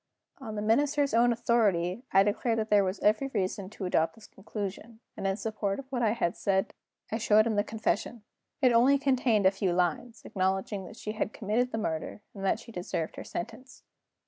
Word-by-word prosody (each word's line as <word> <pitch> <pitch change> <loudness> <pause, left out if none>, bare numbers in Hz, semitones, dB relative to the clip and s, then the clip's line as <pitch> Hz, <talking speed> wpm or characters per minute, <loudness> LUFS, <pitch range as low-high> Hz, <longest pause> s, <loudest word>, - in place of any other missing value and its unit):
On 220 -5 -7
the 210 - -3
Minister's 285 +5 +2
own 240 +1 +5
authority, 210 -5 +1
I 195 +1 +6
declared 225 +3 0
that 220 -1 -2
there 205 -1 +6
was 190 +1 -2
every 215 +6 +3
reason 195 -4 -2
to 200 -2 -6
adopt 160 -2 +1
this 225 - -15
conclusion; 210 +3 -7 0.2
and 195 - -3
in 195 0 0
support 215 -3 -2
of 275 - -7
what 250 -2 -1
I 220 -2 +3
had 180 -7 -1
said 195 -1 0 0.4
I 220 - -1
showed 215 0 +4
him 225 -2 0
the 205 - +2
confession. 220 +1 -2 0.4
It 250 -2 +6
only 255 +4 +5
contained 255 -7 +2
a 190 - +7
few 195 -2 -1
lines, 230 +7 -1
acknowledging 190 +1 -1
that 215 - -11
she 215 - -5
had 215 0 -3
committed 230 +4 0
the - - -2
murder 165 -1 -3
and 195 - -8
that 195 +3 +1
she 230 - -12
deserved 175 -4 -4
her - - -5
sentence. 260 +9 -7
215 Hz, 200 wpm, -29 LUFS, 195-235 Hz, 0.4 s, a